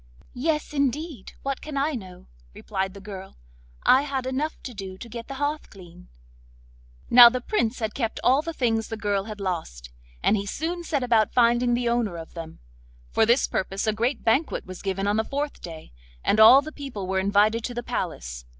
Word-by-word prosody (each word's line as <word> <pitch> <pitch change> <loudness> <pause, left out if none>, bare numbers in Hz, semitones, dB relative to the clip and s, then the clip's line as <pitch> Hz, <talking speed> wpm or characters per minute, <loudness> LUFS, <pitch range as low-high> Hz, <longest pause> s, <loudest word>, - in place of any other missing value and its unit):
'Yes, 300 +4 -1
indeed, 280 - -2
what 275 -1 -3
can 300 -2 -6
I 285 +3 +1
know?' 190 -9 -8 0.3
replied 190 -1 -3
the - - -9
girl; 195 -1 -9 0.5
'I 260 - +6
had 275 -3 -3
enough 275 +5 -2
to 250 - -7
do 190 -3 -7
to 235 - -9
get 235 0 -8
the 275 - -6
hearth 290 +2 -2
clean.' 180 -2 -14 1.0
Now 240 0 +11
the 255 +1 -2
Prince 245 - -1
had 220 -3 -3
kept 230 -4 -2
all 265 +3 +4
the 330 - -4
things 225 -7 0
the 225 - -5
girl 205 -2 -1
had 215 -1 -7
lost, 160 - -4 0.3
and - - +4
he 200 -1 -3
soon 340 - -3
set 295 -5 -1
about 230 -4 +2
finding 240 0 +4
the 240 0 -1
owner 235 -7 0
of 165 -1 -9
them. 165 -2 -8 0.5
For 220 - +3
this 240 +4 +4
purpose 195 +2 -2
a 215 - +1
great 235 +6 -1
banquet 265 +8 +1
was 185 -1 -9
given 195 0 -2
on 205 +1 +1
the 220 - +2
fourth 285 +4 -4
day, 160 -2 -9 0.3
and 215 - +2
all 255 +6 +9
the 310 - -7
people 270 -10 -6
were 190 +1 0
invited 205 +4 +2
to 245 - -5
the 240 - -3
palace. - - -4
230 Hz, 200 wpm, -25 LUFS, 195-270 Hz, 1.0 s, Now